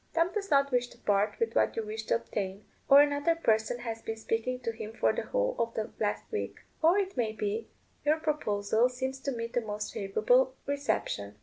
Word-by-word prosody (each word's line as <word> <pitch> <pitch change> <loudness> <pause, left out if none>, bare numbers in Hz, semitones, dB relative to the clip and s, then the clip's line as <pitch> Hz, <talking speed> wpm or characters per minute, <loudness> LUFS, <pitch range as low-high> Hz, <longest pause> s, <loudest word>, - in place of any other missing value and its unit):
Tom 335 +2 +3
does 400 -2 -3
not 280 -1 +4
wish 245 -1 +2
to - - -17
part 205 0 +1
with 460 - 0
what - - +3
you 225 - -2
wish 220 +1 -5
to - - +3
obtain; 200 -3 -4 0.2
or 280 +1 +10
another 290 +3 +1
person 220 -6 +1
has 225 -2 -4
been 225 0 -4
speaking 225 +3 -1
to 230 - -1
him 220 -1 -7
for - - +2
the - - -2
whole - - 0
of 230 0 -1
the 220 - -3
last 210 -1 0
week. 430 - -4 0.2
Or, 335 +4 +5
it 390 -1 -1
may 225 -4 0
be, 215 +1 -2 0.4
your 300 +2 +3
proposal 235 -7 +1
seems 260 +1 -4
to 275 - -2
meet 230 -1 -4
the 245 - +1
most 210 -1 -4
favourable - - +2
reception. 185 - -2
240 Hz, 210 wpm, -30 LUFS, 220-295 Hz, 0.4 s, or